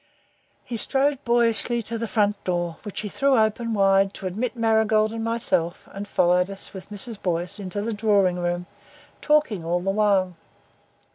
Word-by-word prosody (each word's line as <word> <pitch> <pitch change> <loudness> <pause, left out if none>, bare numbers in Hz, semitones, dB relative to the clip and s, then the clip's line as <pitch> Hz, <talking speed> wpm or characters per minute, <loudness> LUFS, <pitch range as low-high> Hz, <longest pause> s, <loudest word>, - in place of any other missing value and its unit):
He 235 - -5
strode 275 +4 +1
boyishly 235 0 +2
to 230 +2 -5
the 230 0 -3
front 205 -1 0
door, 175 -2 -2
which 205 -2 -5
he 210 - -4
threw 275 +5 +2
open 220 +1 +1
wide 195 0 +3
to - - -8
admit 220 +8 -3
Marigold 220 -1 +2
and 225 0 -4
myself 225 -7 -1
and 200 +1 -7
followed 180 -1 +2
us 195 +1 -4
with 190 0 -10
Mrs. 210 +1 -5
Boyce 175 +2 -2
into 200 +1 -4
the 230 +1 -2
drawing 205 -4 +2
room, 175 0 -2 0.6
talking 300 - +2
all 170 +2 0
the 195 +2 -1
while. 195 -3 +2
205 Hz, 165 wpm, -24 LUFS, 185-230 Hz, 0.6 s, wide